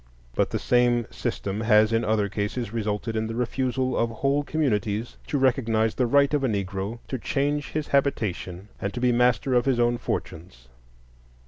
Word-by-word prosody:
But - - +1
the - - -1
same 120 -1 +2
system 100 +2 -3
has 110 0 +4
in 115 +1 +2
other 110 -2 +1
cases 105 +3 -3
resulted 110 0 -2
in 110 0 -1
the 115 - -5
refusal 130 +1 -1
of 115 - +1
whole 135 +5 0
communities 115 -7 -1
to 145 - 0
recognize 115 -4 +2
the 125 - +1
right 140 +3 +3
of 145 -2 +1
a - - +3
Negro 100 0 -3
to 130 - -3
change 145 +4 -1
his 155 -1 -2
habitation 105 -8 -1
and 100 - -2
to - - -3
be 125 0 +3
master 125 +1 +2
of 120 -1 +3
his 130 -3 +2
own 120 0 +2
fortunes. 70 -8 -5
120 Hz, 180 wpm, -25 LUFS, 105-130 Hz, -, has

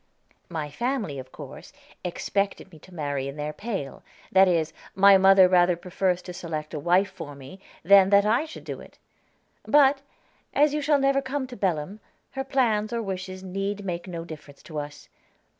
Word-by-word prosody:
My 155 -4 -4
family, 230 - -2
of 130 0 -10
course, - - -11 0.3
expected 195 +2 -2
me 160 - -14
to 185 - -17
marry 145 -5 -3
in 140 - -6
their 150 0 -4
pale; 195 - -5 0.3
that 190 0 +6
is, 165 -3 +1 0.2
my 195 +1 +7
mother 190 -1 +7
rather 180 -1 +4
prefers 180 0 -1
to 180 - -8
select 165 -4 -5
a 150 - -3
wife 180 +6 +2
for 145 -1 -9
me 140 +7 -12 0.2
than 195 +2 +7
that 200 0 +5
I 230 +8 +2
should 320 - -10
do - - -7
it. - - -15 0.6
But, 280 -1 +4 0.5
as 295 +1 +4
you 300 - -1
shall 295 0 +3
never 275 0 +2
come 270 0 -3
to 255 -1 -10
Belem, 190 0 -2 0.3
her 270 0 -3
plans 230 -6 +1
or 235 -1 -2
wishes 185 -1 -5
need 195 +2 -4
make 175 0 -4
no 170 -2 -6
difference 155 -3 -12
to 155 -2 -6
us. 145 0 -8
190 Hz, 180 wpm, -25 LUFS, 160-215 Hz, 0.6 s, my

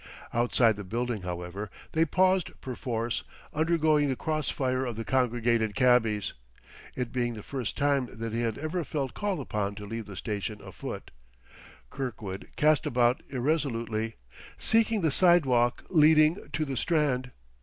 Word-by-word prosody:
Outside 120 -2 +3
the 100 - -5
building, 115 +2 -2
however, 90 +3 -5 0.2
they 160 +1 +3
paused 185 +2 +2
perforce, 120 -2 -3 0.3
undergoing 155 -2 +3
the 130 - 0
cross 155 +2 -2
fire 130 -1 0
of 120 -3 -3
the 115 +1 -5
congregated 120 -4 +1
cabbies. 115 -5 +3 0.6
It 125 -2 -3
being 120 -2 -1
the 105 - -8
first 125 -8 -4
time 140 -3 +2
that 115 -1 -5
he 115 - 0
had 115 -2 -1
ever 165 +3 -2
felt 135 -3 -3
called 205 -3 -2
upon 100 -2 -2
to 105 0 -7
leave 115 +1 -5
the 100 -2 -9
station 105 0 -3
afoot, - - -7 0.8
Kirkwood 110 -8 -5
cast 150 -2 +3
about 120 0 +2
irresolutely, 120 -5 -1 0.4
seeking 225 -1 +2
the 160 -3 +2
sidewalk 135 -9 +4
leading 155 +1 +5
to 155 - -1
the 135 -3 -3
Strand. 140 -6 +1
125 Hz, 145 wpm, -28 LUFS, 115-150 Hz, 0.8 s, leading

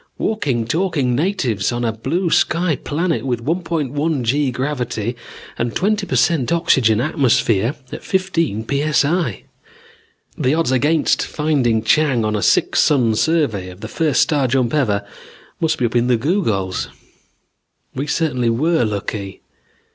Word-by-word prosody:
Walking, 140 - -1
talking 155 -3 0
natives 130 - 0
on 120 0 -2
a 115 - +1
blue 165 - -2
sky 170 -2 +2
planet 165 +6 -2
with 120 -3 -3
1.1 155 -3 -1
g 140 +4 +1
gravity 125 -3 -3 0.4
and 115 0 -1
a - - -15
twenty 205 +1 0
per - - -2
cent 160 -7 +2
oxygen 135 -10 +3
atmosphere 125 - +1 0.2
at - - -7
fifteen 165 - -1
p.s.i. 145 - 0 0.9
The 130 +4 +1
odds 165 -5 0
against 145 +4 +2
finding 135 -8 0
Chang 130 -2 +2
on 105 0 0
a 105 - -1
six - - +2
sun 130 -7 +3
survey 110 - 0
on 90 - -13
the 110 - -5
first 155 +3 +2
star 145 -5 +1
jump 125 -1 0
ever 105 -9 +1 0.5
must 160 -1 0
be 125 - 0
up 115 - -3
in 120 0 +2
the 125 -2 +3
googols. 110 - -1 1.1
We 140 +3 -4
certainly 135 -7 0
were 155 +6 +1
lucky. 100 -2 -4
135 Hz, 145 wpm, -19 LUFS, 115-160 Hz, 1.1 s, oxygen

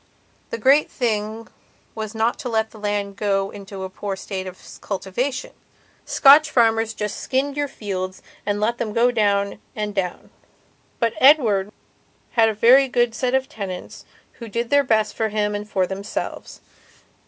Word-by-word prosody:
The - - -3
great 270 +6 +4
thing 220 -1 -2 0.5
was 220 0 -6
not 225 +2 0
to 250 - -4
let 220 -1 0
the 220 - -13
land 205 -1 -2
get 200 -2 +1
into 195 -1 -8
a 190 - -5
poor 195 +1 -4
state 190 -1 -5
of 185 0 -11
cultivation. 240 +8 -3 0.5
Scotch 290 +2 +6
farmers 225 -3 +2
just 210 -1 -4
skinned 275 +2 -1
your 290 0 -1
fields 185 -6 -5 0.2
and 205 0 -1
let 230 +3 0
them 220 -3 -2
go 240 +2 +3
down 200 -3 +1 0.2
and 210 -1 -3
down. 185 -3 -3 0.7
But 230 -2 +1
Edward 225 -9 +5 0.6
had 225 -2 +4
a 220 - -3
very 255 +6 +6
good 240 -2 +1
set 250 +2 0
of 265 0 0
tenants 190 -6 -7 0.4
who 230 - -7
did 230 +3 -3
their 285 0 +5
best 215 -4 +1
for 220 -1 0
him 210 0 0
and 205 +1 -5
for 190 -2 +1
themselves. 195 +2 -6
220 Hz, 165 wpm, -22 LUFS, 200-240 Hz, 0.7 s, Scotch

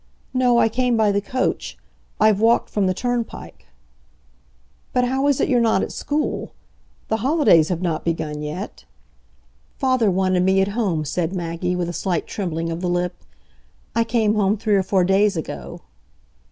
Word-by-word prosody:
"No, 250 -2 +3
I 230 - +5
came 245 +1 +1
by 215 -2 +3
the 200 0 0
coach. 255 +5 -2 0.4
I've 215 -2 +4
walked 230 +2 +3
from 200 -2 +1
the 185 - +1
turnpike." 245 +1 -4 1.3
"But 250 -1 +2
how 265 +3 0
is 285 -2 +2
it - - +2
you're 245 -2 +3
not 225 -1 +2
at - - -4
school? 300 +1 -3 0.6
The 220 - +1
holidays 250 - +4
have 180 -1 -2
not 165 -3 -1
begun 155 -3 -3
yet?" 155 +7 -6 0.9
"Father 255 -5 +2
wanted 185 -1 +1
me 190 +1 +3
at 195 +1 +2
home," 195 -8 -1
said 170 +4 -2
Maggie, 175 +1 -2
with 180 -1 -2
a 175 - -4
slight 175 -2 -1
trembling 165 -4 -3
of 165 +1 -4
the 180 - -1
lip. 175 0 0 0.8
"I 230 - +3
came 225 -2 +1
home 210 0 +2
three 210 0 0
or 195 - +3
four 190 0 +1
days 195 +1 +2
ago." 70 - -6
195 Hz, 170 wpm, -21 LUFS, 175-230 Hz, 1.3 s, I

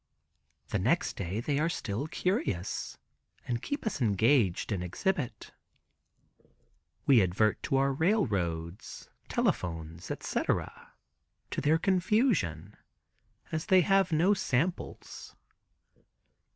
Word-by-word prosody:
The - - 0
next - - +1
day 100 +4 -3
they 145 +3 0
are 165 +2 +2
still 115 -2 -3
curious, 155 - -2 0.5
and 120 -1 -1
keep 285 - -4
us 215 -10 -2
engaged 110 -2 +2
in 95 -4 -1
exhibit. 120 - -2 1.5
We 130 -5 +6
advert 95 +3 +1
to - - -1
our 135 0 +2
railroads, 100 - -1 0.2
telephones, 80 0 -2
etc., - - -3 0.6
to - - -2
their 150 +3 +3
confusion, 190 - +1 0.8
as 160 0 -3
we 185 -1 +7
have 195 0 +3
no 170 +6 +4
samples. 165 0 -3
135 Hz, 100 wpm, -30 LUFS, -, 1.5 s, we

